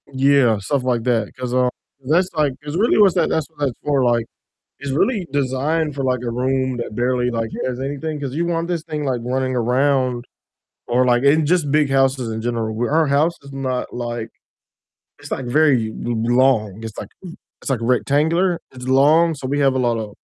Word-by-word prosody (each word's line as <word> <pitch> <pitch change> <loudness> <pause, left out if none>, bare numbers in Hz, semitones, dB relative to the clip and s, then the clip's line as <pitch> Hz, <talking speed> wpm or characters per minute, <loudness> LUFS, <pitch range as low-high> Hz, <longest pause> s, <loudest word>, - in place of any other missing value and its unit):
Yeah, 135 -4 +3
stuff 130 +7 -1
like 125 -3 0
that, 115 -3 0
'cause, 125 -1 -4
um, 125 0 +3 0.3
'cause 130 - -11
that's 180 +3 +3
like 150 -3 +1
'cause 145 +1 -5
really 220 +5 +3
what's 200 -4 +5
that 170 -3 +2
that's 160 -3 -1
what 155 -2 -27
that's 140 -4 0
for, 145 -3 +1
like, 120 -2 +2 0.5
it's 140 - -5
really 190 - 0
designed 145 +3 0
for, 140 - -3
like, 130 -2 0
a 120 - -2
room 130 +1 -1
that 120 -2 -5
barely, 125 +1 0
like 115 -2 -2 0.2
has 125 0 -3
anything, 145 +3 -4
'cause 135 -2 -4
you 165 +3 0
want 170 0 -1
this 170 -3 -2
thing 155 -2 -4
like 130 -3 -1
running 130 +1 -1
around 125 0 +1 0.6
or 125 +1 +2
like 120 0 +2
in 150 +3 +4
just 160 -3 +1
big 150 -1 +3
houses 135 -2 +1
in 110 0 -4
general, 115 -2 -2
our 160 +1 +2
house 145 +5 +2
is 140 - -12
not 130 -2 -3
like 120 -2 -4 0.9
it's - - -12
like 135 - -3
very 130 -3 +3 0.2
l 120 0 -1 0.2
long, 110 -5 +2
it's 110 -2 -7
like - - -7 0.5
it's - - -5
like 130 -4 0
rectangular, 155 +9 +1
it's 125 0 -9
long, 150 +6 +4
so 135 -2 -6
we 145 +2 -1
have 135 -2 +3
a - - +1
lotta 115 -4 -1
130 Hz, 200 wpm, -20 LUFS, 125-150 Hz, 0.9 s, what's